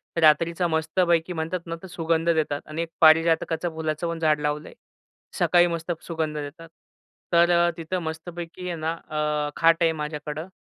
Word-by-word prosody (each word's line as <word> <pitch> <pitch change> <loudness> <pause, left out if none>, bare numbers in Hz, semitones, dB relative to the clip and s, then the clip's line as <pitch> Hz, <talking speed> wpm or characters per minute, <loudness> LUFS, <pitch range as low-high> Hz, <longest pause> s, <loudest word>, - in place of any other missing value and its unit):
तर 170 - 0
रात्रीचा 165 +3 +4
मस्तपैकी 165 +1 +1
म्हणतात 165 +2 -2
ना, 165 -1 -4
तर - - -7
सुगंध 165 -1 0
देतात 155 -3 0
आणि 155 +2 -4
एक 165 - -4
पारिजातकाचं 165 +1 +4
फुलाचं 155 +1 -2
पण 170 -1 -4
झाड 155 -2 +2
लावलंय. 150 +1 -3 0.7
सकाळी 175 0 +5
मस्त 170 0 -3 0.2
सुगंध 160 -2 -2
देतात. 150 +3 -7 0.6
तर 170 0 +5
अ, 175 0 +4
तिथं 170 +3 -3
मस्तपैकी 170 +2 -6
आहे 175 - -3
ना, 160 +1 -1 0.2
अ, 150 -1 -1
खाट 165 0 +5
आहे 165 - +4
माझ्याकडं 150 +1 -5
165 Hz, 165 wpm, -25 LUFS, 155-170 Hz, 0.7 s, सकाळी